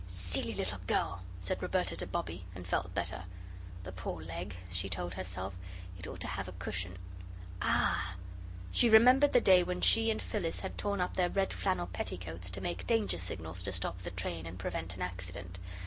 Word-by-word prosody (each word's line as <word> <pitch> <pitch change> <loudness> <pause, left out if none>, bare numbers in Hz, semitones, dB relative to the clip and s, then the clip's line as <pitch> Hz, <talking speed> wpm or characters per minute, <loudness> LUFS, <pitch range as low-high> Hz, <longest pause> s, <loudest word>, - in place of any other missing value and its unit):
"SILLY 90 -1 +1
little - - -1
girl!" 85 +2 +1 0.2
said 90 - -2
Roberta - - +1
to - - -2
Bobbie, 85 +2 -3
and 90 0 -7
felt - - -1
better. 85 - 0 0.6
"The 90 - -6
poor 90 -1 -4
leg," 85 +3 -5 0.2
she 90 +2 -1
told 90 0 -2
herself; 95 +1 -4 0.4
"it 90 -1 -6
ought - - -7
to - - +2
have 95 +1 -3
a 90 - -7
cushion 90 0 -3 0.6
ah!" 85 -1 +2 0.6
She 235 - +5
remembered 255 +6 +8
the 245 - +7
day 185 -3 +7
when 180 0 -2
she 225 0 +6
and 220 - +1
Phyllis 175 -7 -2
had 190 - -4
torn 200 -2 0
up 180 - -1
their 180 -1 +3
red 195 0 +1
flannel 185 - +1
petticoats 90 0 -5
to 95 +2 -6
make 85 -1 -3
danger 95 -6 +2
signals 85 -1 -4
to 100 +2 -2
stop 90 0 -2
the 85 -1 -5
train 85 -2 -3
and 85 +2 -7
prevent 90 -1 -2
an 90 - -3
accident. 90 0 -5
90 Hz, 190 wpm, -33 LUFS, 90-110 Hz, 0.6 s, remembered